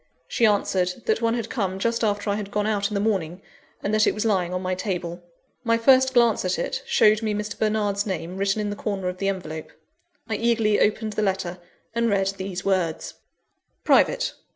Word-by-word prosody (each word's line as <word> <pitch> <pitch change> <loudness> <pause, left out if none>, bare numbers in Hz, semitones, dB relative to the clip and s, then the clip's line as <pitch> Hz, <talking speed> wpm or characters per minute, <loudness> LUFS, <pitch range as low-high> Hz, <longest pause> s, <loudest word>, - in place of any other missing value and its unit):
She 230 - +3
answered, 185 -3 0
that 445 - +1
one 230 0 +1
had 230 -2 -3
come 195 -6 -2
just 230 +4 -1
after 205 0 0
I - - 0
had 205 -1 -5
gone 210 0 -1
out 205 -1 0
in 210 - -4
the - - +1
morning, 190 -5 -1 0.4
and 205 - -1
that 215 0 +4
it - - +2
was 215 - -2
lying 185 -5 +1
on 180 0 -3
my 185 0 -1
table. 180 -2 -4 0.4
My 230 -1 +2
first 260 +2 +4
glance 235 -2 +4
at 185 0 0
it, - - -2
showed 215 +1 +4
me 215 -2 -1
Mr. 210 0 -4
Bernard's 210 -1 0
name 180 -1 -4
written 195 +2 0
in 205 0 -2
the - - -4
corner 200 -3 -3
of 180 0 -7
the 195 - -1
envelope. 160 -5 -5 0.6
I 220 -2 -2
eagerly 225 -2 +2
opened 215 0 +1
the 215 - -1
letter, 190 -3 -1 0.3
and 235 0 +1
read 195 -2 +2
these 190 -1 -5
words: 185 -5 0 0.7
"Private. - - +3
205 Hz, 205 wpm, -24 LUFS, 185-220 Hz, 0.7 s, that